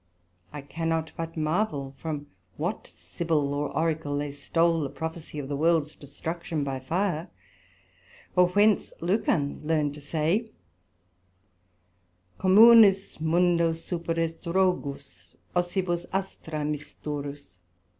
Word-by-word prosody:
I 145 Hz, -, -6 dB
cannot 165 Hz, +2 st, -2 dB
but 165 Hz, 0 st, -5 dB
marvail 155 Hz, -4 st, -1 dB
from 150 Hz, 0 st, -5 dB, 0.3 s
what -, -, -3 dB
Sibyl 155 Hz, -4 st, -2 dB
or 145 Hz, 0 st, -1 dB
Oracle 155 Hz, -2 st, -1 dB
they 145 Hz, 0 st, -2 dB
stole 165 Hz, +4 st, +1 dB
the 140 Hz, -, -2 dB
Prophesie 160 Hz, 0 st, -6 dB
of 145 Hz, -2 st, -4 dB
the 140 Hz, -, -2 dB
worlds 155 Hz, 0 st, +2 dB
destruction 160 Hz, +2 st, -5 dB
by 135 Hz, -1 st, -3 dB
fire, 170 Hz, +4 st, -1 dB, 1.1 s
or 180 Hz, -1 st, +6 dB
whence 205 Hz, +3 st, +3 dB
Lucan 180 Hz, -, 0 dB
learned 150 Hz, -2 st, +1 dB
to 150 Hz, -, -11 dB
say, 165 Hz, +9 st, 0 dB, 1.9 s
Communis 200 Hz, -1 st, +7 dB
mundo 170 Hz, 0 st, +3 dB
superest 165 Hz, 0 st, -3 dB
rogus, 140 Hz, -, -1 dB, 0.2 s
assibus 175 Hz, -1 st, 0 dB
astra 165 Hz, -5 st, -3 dB
Misturus. 145 Hz, -, -5 dB
160 Hz, 105 wpm, -27 LUFS, 145-175 Hz, 1.9 s, Communis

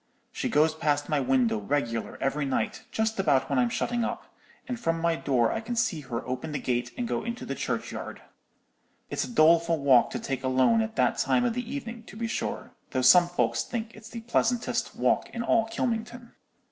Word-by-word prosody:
She -, -, -3 dB
goes 155 Hz, +2 st, +3 dB
past 145 Hz, -2 st, 0 dB
my 150 Hz, -, +2 dB
window 125 Hz, -4 st, +2 dB
regular 115 Hz, 0 st, -2 dB
every 140 Hz, +2 st, 0 dB
night, 135 Hz, -1 st, -2 dB
just 220 Hz, -1 st, -1 dB
about 145 Hz, -7 st, +2 dB
when 135 Hz, -, +2 dB
I'm 120 Hz, -1 st, +3 dB
shutting 240 Hz, -, -1 dB
up, -, -, -5 dB, 0.3 s
and 250 Hz, -2 st, -4 dB
from 165 Hz, -7 st, 0 dB
my 170 Hz, 0 st, +1 dB
door 125 Hz, -7 st, +1 dB
I 225 Hz, -, -2 dB
can 240 Hz, +2 st, -4 dB
see 225 Hz, -8 st, 0 dB
her 120 Hz, -4 st, -5 dB
open 130 Hz, +5 st, -4 dB
the -, -, -1 dB
gate 120 Hz, -1 st, -1 dB
and 245 Hz, -1 st, -2 dB
go -, -, -2 dB
into 235 Hz, +2 st, -5 dB
the -, -, -3 dB
churchyard. -, -, -4 dB, 0.9 s
It's -, -, -1 dB
a -, -, -9 dB
doleful 165 Hz, -4 st, +4 dB
walk 135 Hz, -5 st, +5 dB
to -, -, -4 dB
take 135 Hz, -1 st, -4 dB
alone 130 Hz, -, +3 dB
at 220 Hz, 0 st, -4 dB
that -, -, +2 dB
time 245 Hz, -, +2 dB
of 240 Hz, -, +1 dB
the 245 Hz, 0 st, -4 dB
evening, 240 Hz, -5 st, -5 dB
to 210 Hz, -, -11 dB
be 230 Hz, -, -2 dB
sure, 230 Hz, -, -3 dB, 0.2 s
though 130 Hz, -1 st, -1 dB
some 175 Hz, +7 st, +7 dB
folks 175 Hz, -, 0 dB
think 230 Hz, -1 st, -5 dB
it's 220 Hz, 0 st, -12 dB
the 230 Hz, -1 st, -7 dB
pleasantest 235 Hz, +1 st, 0 dB
walk -, -, +1 dB
in 235 Hz, -, -4 dB
all 225 Hz, -1 st, +3 dB
Kylmington.' 235 Hz, +1 st, -3 dB
170 Hz, 205 wpm, -27 LUFS, -, 0.9 s, some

